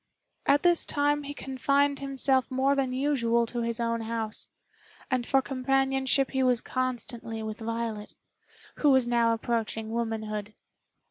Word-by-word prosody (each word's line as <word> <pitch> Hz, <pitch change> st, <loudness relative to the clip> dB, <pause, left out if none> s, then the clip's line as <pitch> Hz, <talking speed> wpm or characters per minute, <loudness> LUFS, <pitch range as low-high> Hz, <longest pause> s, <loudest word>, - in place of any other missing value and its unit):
At 285 Hz, +1 st, +4 dB
this 345 Hz, -1 st, +4 dB
time 290 Hz, 0 st, +1 dB
he 285 Hz, 0 st, -6 dB
confined 280 Hz, +2 st, +1 dB
himself 270 Hz, -1 st, +1 dB
more 265 Hz, +1 st, +2 dB
than 270 Hz, -2 st, 0 dB
usual 255 Hz, -4 st, +1 dB
to 240 Hz, +1 st, -4 dB
his 230 Hz, 0 st, -2 dB
own 230 Hz, 0 st, 0 dB
house, 225 Hz, -1 st, -3 dB, 0.6 s
and 250 Hz, -2 st, 0 dB
for 270 Hz, -1 st, +3 dB
companionship 270 Hz, 0 st, +1 dB
he 265 Hz, -, 0 dB
was 250 Hz, -2 st, +3 dB
constantly 240 Hz, -3 st, -3 dB
with 215 Hz, 0 st, -5 dB
Violet, 230 Hz, -2 st, -4 dB, 0.6 s
who 295 Hz, -, +3 dB
was 260 Hz, -3 st, +4 dB
now 235 Hz, -1 st, +3 dB
approaching 225 Hz, -1 st, -2 dB
womanhood. 220 Hz, -2 st, -3 dB
250 Hz, 140 wpm, -28 LUFS, 230-270 Hz, 0.6 s, At